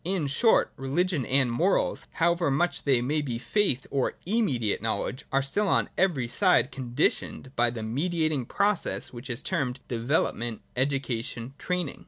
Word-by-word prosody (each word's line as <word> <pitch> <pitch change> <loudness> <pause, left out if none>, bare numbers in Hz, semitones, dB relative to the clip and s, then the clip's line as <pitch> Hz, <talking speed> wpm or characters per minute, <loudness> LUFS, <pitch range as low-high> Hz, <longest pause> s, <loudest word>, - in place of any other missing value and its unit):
In 180 -3 -1
short, 145 - +3
religion 145 +2 0
and 130 -2 +2
morals, 175 +11 +1
however 170 -1 +2
much 160 +6 0
they 135 -4 +3
may 150 +5 0
be 125 -5 -3
faith 135 - 0
or 135 -2 0
immediate 155 - 0
knowledge, 115 +3 -2
are 135 0 +2
still 200 +10 0
on - - +2
every 165 -10 +1
side 150 - +3
conditioned 130 +1 -2
by 120 0 +3
the 115 -2 -5
mediating 155 +2 -1
process 200 -8 0
which 125 +2 -8
is 120 +2 -3
termed 135 -8 -1
development, 120 -2 -1
education, 130 -2 -2
training. 180 -5 -2
135 Hz, 150 wpm, -27 LUFS, 120-175 Hz, -, short